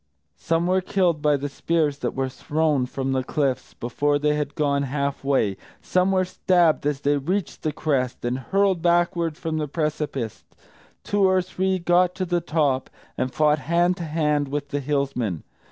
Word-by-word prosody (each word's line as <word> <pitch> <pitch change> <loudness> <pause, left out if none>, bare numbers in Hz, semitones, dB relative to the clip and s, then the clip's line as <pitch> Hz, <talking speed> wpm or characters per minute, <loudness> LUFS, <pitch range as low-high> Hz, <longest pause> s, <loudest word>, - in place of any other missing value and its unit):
Some 165 +1 0
were 185 +1 +2
killed 180 -4 +1
by 150 -1 +3
the 140 +1 -3
spears 150 0 0
that - - -3
were 135 0 0
thrown 145 0 0
from 135 +1 -3
the 130 -1 0
cliffs, 135 -1 -2
before 145 +5 0
they 150 +1 +1
had 150 -1 -3
gone 140 -2 +1
half 140 0 -2
way; 130 -8 +1 0.2
some 185 +1 +1
were 185 -1 +2
stabbed 175 -4 +2
as 145 -1 -1
they 145 0 +2
reached 180 +8 -2
the 155 - -1
crest, 130 -6 -1
and 125 +2 -1
hurled 190 +5 +1
backward 170 -2 +1
from 160 -1 -3
the 150 - -2
precipice; 145 -6 -3 0.6
two 205 -1 +2
or 185 0 +3
three 185 +1 -1
got 180 +1 +2
to 185 - -2
the 175 -1 0
top, 150 -5 0 0.3
and 130 0 -2
fought 150 +2 +3
hand 170 +5 +2
to 175 - -5
hand 150 -2 0
with 145 +1 -4
the 145 - -1
Hillsmen. 135 - -1
150 Hz, 180 wpm, -24 LUFS, 140-175 Hz, 0.6 s, by